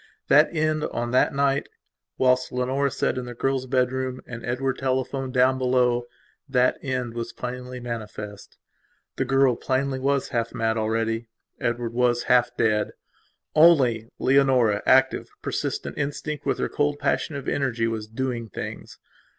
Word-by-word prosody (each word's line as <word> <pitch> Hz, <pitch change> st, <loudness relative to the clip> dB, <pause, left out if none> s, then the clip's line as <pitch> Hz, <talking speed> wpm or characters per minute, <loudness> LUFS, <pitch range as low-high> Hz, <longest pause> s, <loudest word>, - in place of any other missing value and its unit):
That 150 Hz, +3 st, +6 dB
end, 155 Hz, -1 st, 0 dB
on 120 Hz, 0 st, -3 dB
that 130 Hz, -, +3 dB
night, 140 Hz, 0 st, +1 dB, 0.5 s
whilst 130 Hz, 0 st, +2 dB
Leonora 130 Hz, +3 st, 0 dB
sat 130 Hz, 0 st, -1 dB
in 125 Hz, -, -5 dB
the 120 Hz, 0 st, -8 dB
girl's 135 Hz, +1 st, -1 dB
bedroom 130 Hz, 0 st, 0 dB
and 120 Hz, -1 st, -8 dB
Edward 130 Hz, +2 st, -2 dB
telephoned 130 Hz, 0 st, -1 dB
down 130 Hz, +1 st, +3 dB
belowthat 125 Hz, +1 st, 0 dB
end 125 Hz, -3 st, -3 dB
was 115 Hz, 0 st, -4 dB
plainly 125 Hz, 0 st, -6 dB
manifest. 105 Hz, -4 st, -7 dB, 0.6 s
The 135 Hz, -, 0 dB
girl, 135 Hz, -1 st, +3 dB
plainly, 130 Hz, +2 st, -1 dB
was 140 Hz, +1 st, 0 dB
half 115 Hz, -2 st, -2 dB
mad 110 Hz, 0 st, 0 dB
already; 115 Hz, +1 st, -1 dB, 0.3 s
Edward 120 Hz, 0 st, -2 dB
was 120 Hz, 0 st, +2 dB
half 125 Hz, -1 st, +4 dB
dead; 105 Hz, -2 st, +1 dB, 0.6 s
only 130 Hz, -9 st, +5 dB
Leonora, 130 Hz, -6 st, +3 dB
active, 130 Hz, 0 st, +4 dB
persistent, -, -, -3 dB
instinct 145 Hz, +1 st, -3 dB
with -, -, +1 dB
her -, -, -1 dB
cold 145 Hz, 0 st, 0 dB
passion 150 Hz, -, -1 dB
of 140 Hz, 0 st, -6 dB
energy, 120 Hz, -5 st, 0 dB
was 110 Hz, -2 st, -3 dB
"doing 115 Hz, 0 st, -3 dB
things". -, -, -7 dB
125 Hz, 140 wpm, -25 LUFS, 120-135 Hz, 0.6 s, That